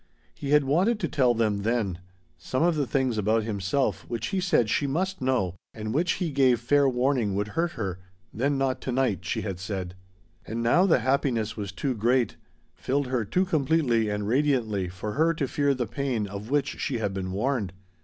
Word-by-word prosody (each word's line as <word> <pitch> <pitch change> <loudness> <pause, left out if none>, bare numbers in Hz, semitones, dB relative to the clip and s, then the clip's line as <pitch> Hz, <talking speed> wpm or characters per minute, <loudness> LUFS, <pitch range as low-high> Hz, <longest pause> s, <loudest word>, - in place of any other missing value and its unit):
He 140 - -6
had 150 0 +5
wanted 185 - +2
to 170 - +1
tell 125 -5 +2
them 110 -3 +1
then 105 -5 -1 0.4
some 130 +4 -2
of 175 0 +4
the 145 -3 0
things 130 -5 0
about 110 +2 +2
himself 100 0 -1
which 115 -2 -3
he 190 - -1
said 175 - +2
she 140 +6 +1
must 185 +6 -1
know 130 -9 +1 0.2
and 110 0 -4
which 170 +5 +2
he 175 -4 -2
gave 130 -4 +3
fair 140 +3 +3
warning 125 -5 +1
would 105 +1 -1
hurt 170 +7 -1
her, 95 -6 -4 0.3
"Then 140 +4 0
not 135 -1 0
to 130 - -3
night," 125 -7 0
she - - -1
had 95 -4 -4
said. 95 -2 -4 0.5
And 115 +2 -4
now 175 +11 +4
the 160 - +4
happiness 120 -4 0
was 100 -3 -5
too 130 +7 -2
great, 120 +1 +1 0.4
filled 140 +2 -1
her 125 -3 0
too 180 - +1
completely 140 - +2
and 105 0 -2
radiantly 115 -7 +1
for 95 +4 -5
her 160 +6 +2
to 145 -3 -1
fear 140 +1 +1
the 125 -2 -1
pain 130 -5 -2
of 100 +2 -7
which 145 0 0
she 130 - -1
had 105 -3 -2
been 95 -1 -3
warned. 105 -1 -1
125 Hz, 200 wpm, -26 LUFS, 105-140 Hz, 0.5 s, had